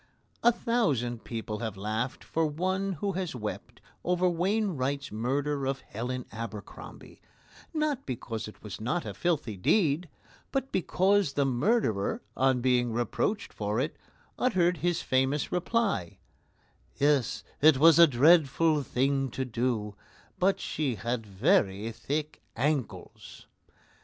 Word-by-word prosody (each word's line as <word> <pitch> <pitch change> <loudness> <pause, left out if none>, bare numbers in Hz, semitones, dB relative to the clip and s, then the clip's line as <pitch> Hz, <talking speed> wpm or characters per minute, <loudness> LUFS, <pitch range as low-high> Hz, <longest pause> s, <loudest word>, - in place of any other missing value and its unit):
A 240 - +6
thousand 145 - 0
people 110 -2 -5
have 110 -4 -4
laughed 110 +5 -3
for 165 0 0
one 185 +5 -1
who 195 +5 -2
has 185 -5 -3
wept 105 -3 -6 0.2
over 180 +1 +2
Wainwright's 170 -7 0
murder 135 +5 -1
of 135 0 -2
Helen 125 +2 -5
Abercrombie, 110 -2 -9 0.5
not 305 -4 -1
because 115 -3 -4
it 105 - -13
was 105 -1 -7
not 165 +10 -1
a - - -5
filthy 155 -11 -1
deed, 160 - +2 0.4
but 270 0 -2
because 190 -2 +2
the 140 - +1
murderer, 130 - +1
on 130 -1 +2
being 125 -1 +2
reproached 120 - -1
for 105 +2 -2
it, 150 +4 -1 0.4
uttered 180 -8 +2
his 175 +2 0
famous 130 +3 +1
reply: 180 - 0 0.8
"Yes; 140 -4 +1 0.2
it 155 -2 +7
was 165 +3 +7
a 170 - +10
dreadful 155 +2 +4
thing 135 +1 0
to 130 +2 -3
do, 115 -3 -1 0.5
but 190 +2 +2
she 140 -6 -2
had 115 +2 -3
very 105 - +1
thick 150 +6 -4
ankles." 135 0 -3
140 Hz, 125 wpm, -29 LUFS, 120-175 Hz, 0.8 s, a